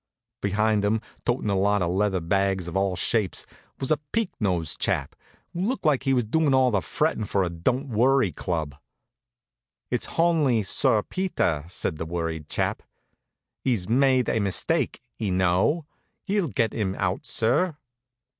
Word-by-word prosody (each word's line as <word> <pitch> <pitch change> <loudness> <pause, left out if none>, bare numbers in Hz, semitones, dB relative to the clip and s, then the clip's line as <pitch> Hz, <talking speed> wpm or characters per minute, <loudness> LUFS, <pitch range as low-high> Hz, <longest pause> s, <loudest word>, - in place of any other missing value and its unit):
Behind 105 +1 +1
'em, 105 +2 +2 0.3
totin' 105 - 0
a - - +1
lot 100 0 +2
of 85 - 0
leather 95 0 +1
bags 95 +1 0
of 85 - -6
all 95 -1 +1
shapes, 105 +1 0 0.3
was 135 - -1
a 155 - +4
peaked 225 -4 0
nosed 90 -6 0
chap, - - -1 0.4
who 175 - -3
looked 245 +8 -1
like 145 -4 +3
he 135 - +3
was 125 - +2
doin' 140 +5 +2
all 130 -1 +4
the 100 -3 +1
frettin' 130 - -1
for 100 -1 0
a 90 - -2
Don't 125 - -1
Worry 125 -2 +3
Club. 80 -2 -3 1.2
"It's - - 0
honly 155 -9 +3
Sir 105 +2 +2
Peter," 175 - -1
says 90 - -1
the 80 - -4
worried 80 -2 -3
chap. - - -1 0.8
"'E's 115 -9 +1
myde 130 +1 +3
a 110 - +1
mistyke, 100 -4 0 0.2
y' 110 -3 -1
know. 95 - +2 0.4
Hi'll 200 -3 +1
get 115 -5 0
'im 95 -4 -1
out, 90 -1 -2
sir." 145 +9 +1
105 Hz, 160 wpm, -25 LUFS, 95-135 Hz, 1.2 s, a